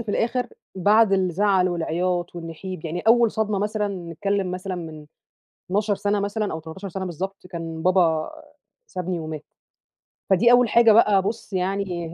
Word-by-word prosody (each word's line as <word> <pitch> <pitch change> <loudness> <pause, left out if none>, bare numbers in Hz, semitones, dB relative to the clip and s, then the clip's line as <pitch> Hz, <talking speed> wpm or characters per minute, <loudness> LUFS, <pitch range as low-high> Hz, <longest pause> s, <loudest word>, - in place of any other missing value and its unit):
في 230 - -8
الآخر 240 +4 0 0.3
بعد 205 +3 +4
الزعل 190 0 +2
والعياط 175 +1 -1
والنحيب 165 +1 -7
يعني 165 +2 -3
أوّل 230 +2 +4
صدمة 215 -2 -1
مثلًا 210 +1 -1 0.2
نتكلّم 200 +1 -1
مثلًا 185 +1 -4
من 155 -3 -8 0.6
12 205 +1 +1
سَنة 205 +1 0
مثلًا، 205 0 -2
أو 160 - -4
13 170 +5 -8
سَنة 190 +1 -5
بالضبط 185 +2 -6
كان 165 -3 -6
بابا 170 -4 +2 0.6
سابني 180 -1 -4
ومات. 155 -1 -6 0.9
فدي 230 +6 +5
أوّل 245 -2 +5
حاجة 230 -1 +6
بقى 210 -3 +5
بُص 215 0 -5
يعني 180 -3 -2
190 Hz, 150 wpm, -23 LUFS, 175-210 Hz, 0.9 s, حاجة